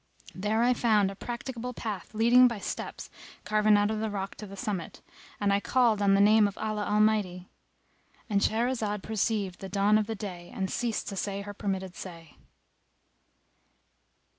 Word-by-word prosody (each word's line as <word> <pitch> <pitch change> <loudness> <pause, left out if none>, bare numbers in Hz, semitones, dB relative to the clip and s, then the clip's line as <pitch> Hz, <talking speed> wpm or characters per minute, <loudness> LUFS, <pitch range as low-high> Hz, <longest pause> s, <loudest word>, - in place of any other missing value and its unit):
There 210 +4 0
I 250 +1 +4
found 215 -5 +2
a - - -9
practicable 240 +2 -6
path 215 -2 -5
leading 240 +3 +6
by 235 -2 -3
steps - - -6 0.3
carven 215 0 +4
out 205 +1 +2
of 215 - -2
the 220 0 -1
rock 195 -1 -4
to 210 - -8
the 195 0 -10
summit, 190 -3 -4 0.4
and 200 -1 +2
I 200 - +3
called 230 -2 +2
on 200 -1 +4
the - - +3
name 210 +1 +6
of 200 - -7
Allah 215 -1 -2
Almighty"[FN#259]—And 205 0 -2
Shahrazad 220 -3 0
perceived 210 -3 -1
the 195 - -7
dawn 205 +2 +3
of 210 - -2
day 180 -4 -7
and 190 -1 -2
ceased 235 -2 -2
to 200 - -6
say 200 +1 -3
her 205 0 -7
permitted 190 -2 -3
say. 165 -4 -10
210 Hz, 165 wpm, -28 LUFS, 195-220 Hz, 0.4 s, leading